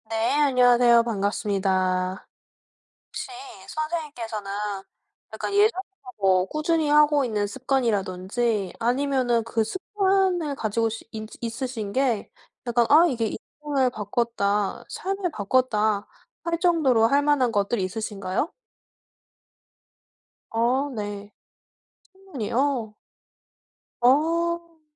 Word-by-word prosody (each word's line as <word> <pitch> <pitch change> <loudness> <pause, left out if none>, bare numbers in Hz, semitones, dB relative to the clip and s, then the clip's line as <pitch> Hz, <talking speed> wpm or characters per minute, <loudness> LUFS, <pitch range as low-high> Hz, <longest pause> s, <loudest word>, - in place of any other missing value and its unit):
네 225 0 0
안녕하세요. 245 -4 +5
반갑습니다. 190 -3 -1 0.8
혹시 - - -6 0.4
선생님께서는 285 -10 -4 0.8
약간 - - -4
예전부터 390 - 0
뭐 190 -2 +3
꾸준히 310 - 0
하고 295 -1 +5
있는 210 -4 -1
습관이라든지 215 -4 -1
아니면은 245 -1 +1
그 225 0 0
습관을 375 - 0
가지고 225 -1 0
시 225 0 -7
있 215 -1 -7
있으신 230 -3 -4
게 255 -6 0 0.4
약간 240 0 +3
'아 315 +4 +7
이게 235 -7 -1 0.3
인생을 280 -4 +1
바꿨다. 210 -2 -1
삶을 385 -2 -3
바꿨다.' 215 -3 +1 0.4
할 335 -1 -1
정도로 310 -11 +3
할 280 +4 +3
만한 285 -5 +2
것들이 200 0 0
있으신가요? 200 - -3 2.0
어 250 +5 +1
네. 205 -1 -5 0.8
신문이요? 270 - -2 1.0
어. 335 +5 +1
240 Hz, 225 characters per minute, -25 LUFS, 210-295 Hz, 2.0 s, 아